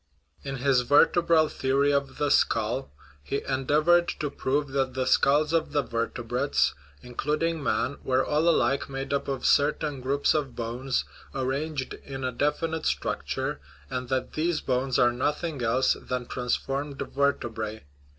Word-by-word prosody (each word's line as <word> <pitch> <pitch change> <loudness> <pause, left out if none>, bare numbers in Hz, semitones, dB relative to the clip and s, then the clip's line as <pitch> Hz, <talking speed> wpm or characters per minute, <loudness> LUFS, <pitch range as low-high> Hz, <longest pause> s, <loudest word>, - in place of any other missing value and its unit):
In 135 -1 -4
his 130 -1 +3
vertebral 160 +4 +4
theory 140 +1 +1
of 140 -1 -1
the 145 -1 0
skull 115 +3 +1 0.3
he 140 - -3
endeavored 150 +6 +3
to 150 -2 -2
prove 140 +1 -1
that 135 -1 -1
the 130 -1 0
skulls 150 +4 +3
of 165 -2 0
the 145 -1 +2
vertebrates 115 - 0 0.3
including 150 +6 -1
man 140 0 -1
were 130 0 +1
all 155 +3 +2
alike 140 -4 +2
made 135 +1 -4
up 140 - -1
of 135 -2 -3
certain 145 -1 +2
groups 140 +4 +1
of 145 -5 -2
bones, 125 +3 -2 0.3
arranged 135 +1 -2
in 135 -1 -8
a 130 - 0
definite 155 +5 -1
structure, - - -2 0.3
and 125 -1 -3
that 130 -1 -1
these 160 0 0
bones 130 0 0
are 120 - +5
nothing 145 +3 -2
else 120 +3 +3
than 125 -1 -4
transformed 135 +4 -2
ver 140 0 +1
tebrae. 110 -3 -6
135 Hz, 150 wpm, -27 LUFS, 125-150 Hz, 0.3 s, are